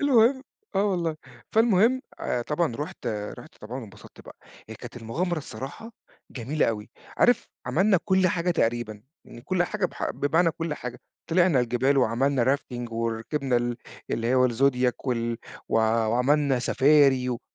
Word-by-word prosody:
المهم 260 -1 +4 0.3
آه 195 - +2
والله، 170 -5 0 0.4
فالمهم 225 +3 +4 0.2
آآ، 120 - -1
طبعًا 150 -2 -1
رُحت 145 -3 -6
رُحت 105 +2 -5
طبعًا 120 +5 -6
وانبسطت 110 -5 -13
بقى. - - -13 0.3
هي - - -7
كانت - - -10
المغامرة 155 +10 -2
الصراحة 150 - -8 0.4
جميلة 135 +5 -1
أوي، 105 -2 -3 0.3
عارف 245 -2 +3 0.2
عملنا 190 +10 +3
كُلّ 190 -2 +3
حاجة 175 +1 0
تقريبًا، 115 -8 -1 0.2
يعني 120 - -12
كُلّ 175 +6 +1
حاجة 195 +1 -1
ب - - -16
حق - - -2
بمعنى 165 +4 +2
كُلّ 165 -1 -4
حاجة، 125 -2 -7 0.3
طلعنا 175 -5 +4
الجبال 125 +3 +1
وعملنا 130 +2 +2
rafting 120 -3 -8
وركبنا 115 +4 -1
ال 120 0 -1 0.3
اللي 115 +3 0
هو 130 - +5
الزوديك 125 +1 +1
وال 115 -2 -1 0.3
و - - -2
وعملنا 125 +5 +2
سفاري 135 0 +4
و 120 -2 -2
135 Hz, 150 wpm, -26 LUFS, 120-170 Hz, 0.4 s, هو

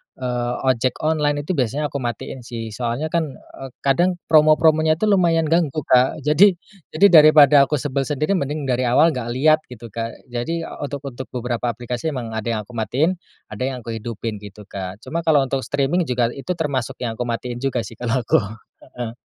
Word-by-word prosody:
eee, 125 -1 -2 0.2
ojek 125 0 -1
online 150 -2 +1
itu 150 - -3
biasanya 145 -1 -1
aku 140 - -3
matiin 120 0 -5
sih, 115 -2 -6
soalnya 120 +7 -3
kan, 160 -5 -1
eee, 135 - -11
kadang 175 +7 +2 0.2
promo-promonya 155 0 +5
itu 165 - -7
lumayan 175 -6 +3
ganggu 155 -3 +1
Kak. 130 +4 +2
Jadi 170 +7 +5 0.4
jadi 200 +5 +6
daripada 150 -3 +7
aku 150 - 0
sebel 140 -1 -2
sendiri 150 +6 0
mending 145 +2 -3
dari 125 -2 0
awal 150 +7 +4
nggak 125 -4 -4
lihat 155 +4 +4
gitu 115 -2 -11
Kak. 115 +2 -5 0.2
Jadi, 165 +8 -3 0.2
untuk 145 0 -5
untuk 130 -1 -7
beberapa 120 -1 -3
aplikasi 120 +4 -4
emang 115 -3 -5
ada 110 0 -4
yang 105 - -2
aku 105 - -17
matiin, 135 +10 0 0.3
ada 105 +3 -4
yang 125 -3 -5
aku 115 - -6
hidupin 110 -1 -5
gitu 105 0 -11
Kak. 95 +2 -7
Cuma 165 - -3
kalau 145 -4 +5
untuk 135 +1 -2
streaming 140 +6 0
juga 120 -2 0
itu 170 +8 -4
termasuk 140 -7 -2
yang 115 -2 -4
aku 125 - -2
matiin 120 +1 -4
juga 130 -3 -1
sih 115 0 -11
kalau 120 0 -1
aku. - - +3 0.4
Heeh. 120 -2 -7
135 Hz, 190 wpm, -21 LUFS, 120-155 Hz, 0.4 s, daripada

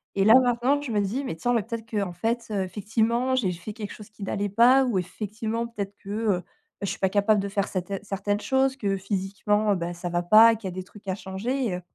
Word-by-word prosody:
Et 195 - +2
là, 220 - +8
maintenant, 250 +3 +2
je 265 -5 -5
me 205 - +2
dis: 240 +8 -2
«Mais, 165 - -3
tiens, 245 +9 -1
mais, 230 - +2
peut-être, 230 +1 -6
qu'en 200 -5 -2
fait, 230 +6 -2
heu, 195 -2 0
effectivement, 225 +6 0
j'ai 200 -8 +1
fait 180 +5 -7
quelque 210 -2 -6
chose 210 0 -12
qui 210 -1 -11
n'allait 200 +1 -1
pas 250 +6 +5
ou, 230 -6 0
effectivement, 220 +5 -4
peut-être 205 -3 -5
que, 200 - -12
heu, 210 -3 0
bah, - - -12 0.4
je - - -1
suis - - -4
pas 190 - +2
capable 205 +1 +3
de 200 - -4
faire 200 0 -1
cetairnes 190 +1 -4
certaines 205 +1 -2
choses 265 0 +1
que 200 -5 0
physiquement, 200 +2 0
heu, - - +1
bah, 175 -1 -3
ça 175 +1 -6
va 175 0 -1
pas 220 +5 +8
et - - -2
qu'il 205 -3 -5
y 180 - -7
a - - -12
des 185 - -4
trucs 205 +1 -17
à 185 - 0
changer» 225 +8 -3
et 180 - -2
heu 180 - -6
205 Hz, 265 wpm, -26 LUFS, 195-230 Hz, 0.4 s, là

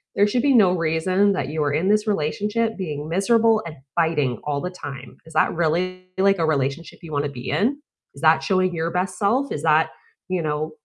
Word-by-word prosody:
there 205 - +4
should 240 +3 0
be 280 0 +3
no 195 -5 +6
reason 185 +4 +1
that 190 - -2
you 155 +1 -2
are 145 -1 0
in 175 +6 +1
this 215 +1 +2
relationship 210 +6 -1
being 150 -6 -4
miserable 220 +5 +3
and 155 - -8 0.2
fighting 150 -8 +1
all 145 -1 -1
the 180 - -4
time. 135 -7 -9
Is 160 - -13
that - - +2
really, 180 +3 -1
like, 195 0 +3
a 165 - +2
relationship 145 +1 -2
you 165 - -9
wanna 145 0 0
be 125 -3 -7
in? 265 +7 +1 0.4
Is 140 - -12
that 160 0 +5
showing 185 -1 +1
your 165 0 -1
best 180 +1 -2
self? 250 +7 +1
Is - - -4
that, - - +3 0.4
you 185 -1 0
know 155 0 -2
175 Hz, 210 wpm, -22 LUFS, 155-200 Hz, 0.4 s, no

